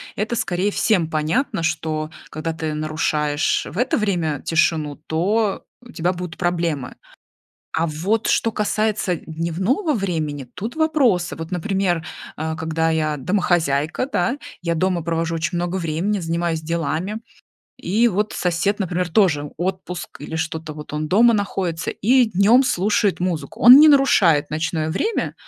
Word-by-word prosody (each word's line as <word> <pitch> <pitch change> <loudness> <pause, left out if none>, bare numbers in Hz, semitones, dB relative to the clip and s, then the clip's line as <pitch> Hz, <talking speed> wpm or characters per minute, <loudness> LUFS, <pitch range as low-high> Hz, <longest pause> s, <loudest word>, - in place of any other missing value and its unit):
это 220 +3 -2
скорее 190 0 -1
всем 185 -9 +1
понятно, 165 - -1
что, 155 -1 -2 0.2
когда 160 +1 -4
ты 160 -1 -3
нарушаешь 150 -1 0
в 180 - -10
это 245 - +1
время 170 -9 -1
тишину, 155 -2 +1
то 200 +6 0 0.2
у 245 - -14
тебя 175 0 -1
будут 180 -1 -7
проблемы. 170 -7 -1 0.8
А 165 +1 +1
вот 190 +9 -1
что 225 - +2
касается 210 -3 0
д - - -10
дневного 185 - -1
времени- 160 - -2
тут 225 +7 -5
вопросы. 275 - +2
Вот, 165 +2 -7
например, 180 -2 -1 0.3
а, 160 +1 -3
когда 160 0 -1
я 155 -2 0
домохозяйка, 170 - 0
да, 260 +3 0 0.2
я 170 -1 -1
дома 180 0 0
провожу 165 0 -1
очень 165 +2 -2
много 175 +2 -2
времени, 175 +5 -1
занимаюсь 165 -1 -1
делами. 170 +6 -2 0.6
И 225 +6 +2
вот 210 +1 -1
сосед, 180 +4 0
например, 180 -2 -1
тоже- 160 -6 +2
отпуск, 180 -1 -5
или 160 +2 -5
что-то 160 -1 -4
вот 150 -1 -10
он 150 0 -3
дома 230 +4 +5
находится 185 -5 -2
и 245 +3 +3
днем 215 +6 +4
слушает 205 -3 +1
музыку. 165 -6 -3
Он 245 +3 +10
не 305 +1 +8
нарушает 185 - +4
ночное 155 0 -1
время, 425 - -1
175 Hz, 145 wpm, -21 LUFS, 160-205 Hz, 0.8 s, Он